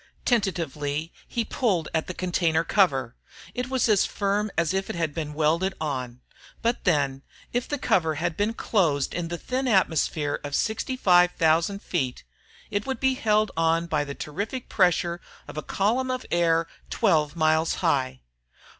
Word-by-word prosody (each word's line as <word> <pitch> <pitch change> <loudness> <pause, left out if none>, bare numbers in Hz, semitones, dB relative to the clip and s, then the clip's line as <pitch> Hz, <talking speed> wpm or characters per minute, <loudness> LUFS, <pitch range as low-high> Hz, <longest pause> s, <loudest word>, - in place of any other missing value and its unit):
Tentatively 165 - -1
he 235 -2 -2
pulled 195 - 0
at 160 -1 0
the 180 - -5
container 170 -3 +1
cover, 140 - +2 0.4
it 250 +1 -3
was 260 -2 +1
as 210 -4 +4
firm 205 +1 0
as 170 +1 +2
if 190 0 -1
it - - -3
had 165 -3 -1
been 150 -2 -4
welded 165 +5 +1
on. 130 -5 -4 0.4
But 235 +1 0
then, 140 -6 +1 0.3
if 245 0 -1
the 290 - -2
cover 160 - +1
had 170 +2 -2
been 210 +4 0
closed 160 - +1
in 175 -1 -2
the 175 +1 -4
thin 260 +7 -2
atmosphere 160 - +1
of 145 -1 -3
65,000 180 -6 +2
feet, 130 -8 -2 0.5
it 205 +2 -2
would 265 - -2
be 265 0 +3
held 215 -4 +2
on 165 +1 +2
by 150 -3 0
the 140 -1 -6
terrific 205 - -5
pressure 175 -2 +2 0.3
of - - -9
a 155 - -3
column 235 +10 0
of 255 0 -2
air 165 -1 +3 0.2
twelve 150 -1 +2
miles 160 0 +2
high. 130 -5 +1
170 Hz, 160 wpm, -26 LUFS, 155-210 Hz, 0.5 s, as